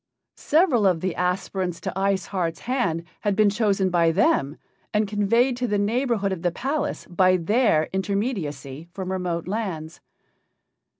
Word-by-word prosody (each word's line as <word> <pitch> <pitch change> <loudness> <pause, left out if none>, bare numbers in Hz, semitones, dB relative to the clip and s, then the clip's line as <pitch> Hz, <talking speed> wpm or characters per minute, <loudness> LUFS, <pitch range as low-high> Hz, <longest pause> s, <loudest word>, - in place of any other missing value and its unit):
Several 295 - +3
of 175 -4 +1
the 185 -2 -2
aspirants 180 -1 -2
to - - -4
Ice 195 0 0
Heart's 170 -4 -2
hand 235 -10 -1 0.2
had 205 -2 0
been 210 -1 +4
chosen 200 -3 +1
by 170 -1 +3
them 160 -5 +2 0.4
and 210 0 +2
conveyed 230 +5 +2
to 250 0 -1
the 205 -2 0
neighborhood 220 -1 0
of 185 -3 -3
the 175 - +2
palace 270 - -3
by 185 +1 +3
their 180 -3 +2
intermediacy 180 - -3
from 190 0 -4
remote 180 -3 -2
lands. 185 -7 -4
195 Hz, 145 wpm, -24 LUFS, 175-215 Hz, 0.4 s, been